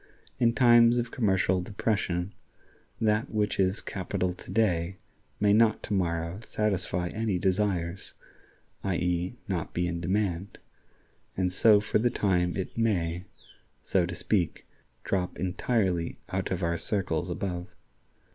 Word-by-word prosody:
In 115 -1 +3
times 120 -1 +6
of 120 -1 -1
commercial 95 -5 +1
depression, 100 -3 -1 0.7
that 110 +3 +1
which 105 -2 -1
is 95 +2 +2
capital 95 -1 -2
to - - -14
day 95 -4 +1 0.4
may 100 0 +4
not 110 0 +4
to - - -3
morrow 85 -1 -1
satisfy 95 -5 -1
any 110 -2 -1
desires 90 -2 -1 0.7
(i.e., 90 +1 -1
not 90 -5 -3
be 90 - +1
in 85 0 -3
demand), 95 0 -1 0.8
and 90 -1 0
so 105 +2 +6
for 105 0 0
the 120 +2 +3
time 90 -6 +1
it 95 - -4
may, 90 -6 0 0.6
so 90 -3 +1
to 90 - -5
speak, 90 -1 -1 0.4
drop 90 -2 -1
entirely 95 -2 0
out 95 0 -2
of 95 -1 -2
our 85 0 0
circles 90 -3 +1
above. 90 0 -3
95 Hz, 130 wpm, -28 LUFS, 90-105 Hz, 0.8 s, times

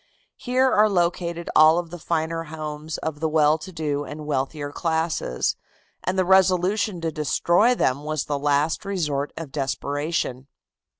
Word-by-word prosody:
Here 255 +1 +2
are 215 +1 +4
located 170 -2 -1
all 155 +1 +7
of 170 -2 -3
the 175 - -7
finer 165 0 -2
homes 155 0 -6
of 155 -2 -4
the 160 0 0
well 155 0 +3
to 175 +5 -9
do 150 -4 -2
and 150 +1 -8
wealthier 145 +1 -2
classes, 160 - -1 0.5
and 185 +1 -1
the 185 - +2
resolution 190 +1 +3
to 165 -1 -1
destroy 170 - +2
them 140 - 0
was 155 -2 -2
the 145 -1 -2
last 145 +4 +1
resort 150 -8 -2
of 165 -4 -6
desperation. 140 -1 -2
160 Hz, 155 wpm, -24 LUFS, 150-175 Hz, 0.5 s, all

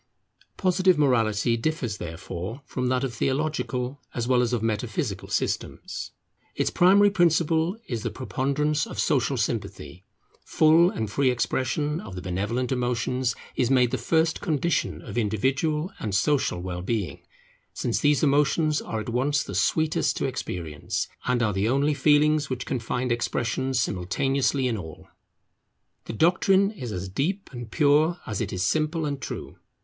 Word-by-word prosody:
Positive 185 -2 +3
morality 115 -5 +2
differs 120 -3 -2
therefore 90 - -6
from 125 -1 -2
that 130 +1 +1
of 130 -3 -2
theological 135 0 -2
as 120 -1 -2
well 125 -1 +4
as 120 -1 0
of 120 -3 -1
metaphysical 110 0 -2
systems. - - -3 0.5
Its - - 0
primary 200 +3 +5
principle 170 0 +2
is 115 -3 -3
the - - -2
preponderance 140 +3 -1
of - - -8
Social - - +1
Sympathy. 90 - -3 0.4
Full 160 +3 +5
and 110 - -3
free 130 +5 +1
expansion 130 +5 -1
of 95 -3 -9
the 90 - -5
benevolent 105 +8 -2
emotions 125 0 0 0.2
is 125 - +1
made 125 -3 +4
the - - 0
first 160 0 +1
condition 160 +1 -1
of - - -3
individual 135 - 0
and 105 -3 -2
social 130 - +1
well 90 -1 -4
being, 95 -6 -3 0.5
since 120 - -1
these 145 0 +3
emotions 150 +2 +2
are 110 - -4
at 110 - -6
once 135 +4 +1
the - - -7
sweetest 155 - +1
to - - -1
experience, 80 -4 -3 0.2
and 125 -1 +2
are 105 -2 +1
the 100 +4 0
only 140 +4 +2
feelings 150 +1 +3
which 130 -1 -3
can 130 - -2
find 125 +2 -2
expression 120 +2 -1
simultaneously 130 +5 0
in 115 -3 -1
all. 80 -5 -10 1.0
The - - -5
doctrine 190 - +3
is 130 - -7
as 95 -1 -4
deep 160 - -2
and 120 -2 -7
pure 155 +5 +3
as 105 -1 -3
it 105 - -2
is 90 -1 -1
simple 155 - 0
and 140 -2 -3
true. - - -6
130 Hz, 155 wpm, -25 LUFS, 110-150 Hz, 1.0 s, primary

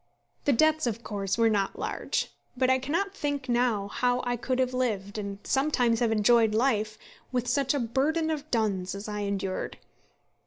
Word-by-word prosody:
The 285 - +4
debts, 310 +2 +3
of 230 0 -3
course, 200 -1 -2
were 230 -1 +4
not 205 -3 0
large, - - -2 0.3
but 255 0 +3
I 260 - +3
cannot 335 +9 -1
think 285 -6 -3
now 240 -4 +1
how 245 +4 0
I 245 0 0
could 255 +2 -2
have 255 -1 +1
lived, 215 -5 -1
and 200 -1 -4
sometimes 255 -5 +2
have 235 -2 +2
enjoyed 225 0 +4
life, 220 -3 +1 0.3
with 250 -1 -1
such 270 +3 +1
a - - +1
burden 290 +7 +1
of 305 -1 -4
duns 200 -6 0
as 200 +2 -6
I 210 0 -3
endured. 200 -2 -3
240 Hz, 180 wpm, -28 LUFS, 210-270 Hz, 0.3 s, The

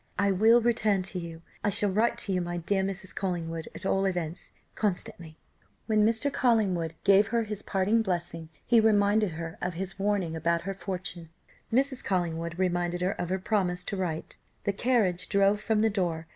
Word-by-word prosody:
I 200 0 +2
will 220 +5 +5
return 215 -5 +2
to 185 0 -3
you, 165 -1 -8 0.2
I - - +2
shall 205 0 +2
write 230 +4 +1
to 195 - -1
you, 180 - +1
my 175 0 -3
dear 190 +3 0
Mrs. 190 -1 -4
Collingwood, 165 -4 -3
at - - -7
all 195 0 +1
events, 175 -3 -3 0.2
constantly." 175 -5 -3 0.5
When 215 -2 +3
Mr. 230 +6 +2
Collingwood 190 -9 +1
gave 200 +1 +5
her 235 0 0
his 210 -1 -5
parting 205 +4 +1
blessing 170 -5 -3 0.2
he 235 -1 +5
reminded 210 -3 +3
her 165 0 -6
of 180 -1 -2
his 190 +2 -4
warning 195 -5 0
about 170 +1 0
her 195 +3 -4
fortune. 180 -3 -6 0.4
Mrs. 265 +2 +1
Collingwood 170 -2 -2
reminded 175 -1 0
her 185 +2 +1
of 175 - -4
her 190 - 0
promise 185 -3 0
to - - -3
write. 175 -4 -4 0.2
The 200 - 0
carriage 195 -6 +1
drove 200 +1 +3
from 215 -1 +1
the 220 - +3
door. 175 -5 -1
190 Hz, 185 wpm, -28 LUFS, 175-210 Hz, 0.5 s, will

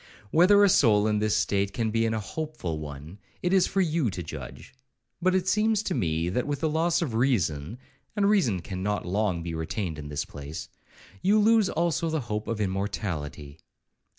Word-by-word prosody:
Whether 200 +5 +6
a - - +7
soul 110 - +4
in 105 -1 +1
this 105 0 +1
state 100 0 0
can 110 +1 -1
be 115 +1 +1
in 110 - -1
a - - -1
hopeful 110 - -4
one, 75 +5 -9 0.2
it 180 +1 +1
is 190 -2 +4
for 195 - +1
you 160 -7 +1
to 90 -2 -5
judge; 75 -5 -9 0.5
but 185 +1 +2
it 190 0 0
seems 215 +1 +2
to 190 - -2
me, 85 - 0
that 125 +9 -1
with 145 -1 -2
the 160 - +1
loss 165 +2 +1
of 135 -8 -3
reason, 110 - 0 0.4
(and 205 -2 +2
reason 155 - +2
cannot 95 +3 -3
long 95 -2 0
be 85 -1 -4
retained 80 0 -3
in 75 -1 -7
this 75 - -3
place), 70 +2 -8 0.5
you 205 +3 +4
lose 215 -1 +4
also 165 0 0
the 160 -1 -1
hope 105 -3 -4
of 115 -2 -2
immortality. 90 -7 -3
110 Hz, 190 wpm, -27 LUFS, -, 0.5 s, a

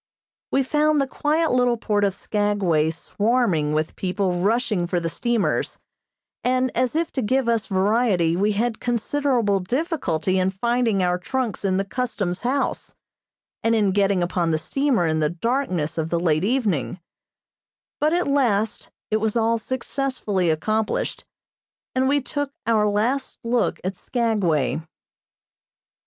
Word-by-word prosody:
We 270 - +3
found 300 +2 +2
the 275 - +2
quiet 305 +4 0
little 245 -1 +2
port 210 -2 0
of 195 -2 +1
Skagway 200 -7 +1
swarming 190 -2 0
with 155 +1 -1
people 185 -1 -1
rushing 210 -3 +1
for 175 0 0
the 165 -1 -3
steamers, 235 0 0 0.7
and 255 0 +1
as 255 +3 +1
if 330 +1 0
to 265 - -2
give 255 +3 +1
us 230 -2 +1
variety 195 -4 +2
we 205 +4 +1
had 225 +2 -1
considerable 240 -3 +1
difficulty 190 - -1
in 185 0 +2
finding 225 0 +1
our 180 0 +1
trunks 245 +2 -3
in 190 -1 +1
the 195 - 0
custom's 200 -6 -2
house, 260 +3 -2 0.7
and 230 0 +3
in 205 -3 +2
getting 195 -2 +2
upon 175 -1 0
the 160 - +2
steamer 250 - 0
in 160 -1 +1
the 150 -1 +2
darkness 175 - -1
of 160 0 -2
the 170 - 0
late 160 -2 +1
evening; 200 - 0 1.0
but 305 +1 +2
at 350 0 +1
last 235 -6 +1 0.2
it 215 - +3
was 220 +1 0
all 230 0 +2
successfully 250 -7 -2
accomplished, 215 +7 -1 0.7
and 260 0 +2
we 285 +1 +2
took 285 +2 -3
our 220 -2 +3
last 230 +7 0
look 235 +1 0
at 190 +1 -2
Skagway. 185 - 0
215 Hz, 145 wpm, -23 LUFS, 180-250 Hz, 1.0 s, We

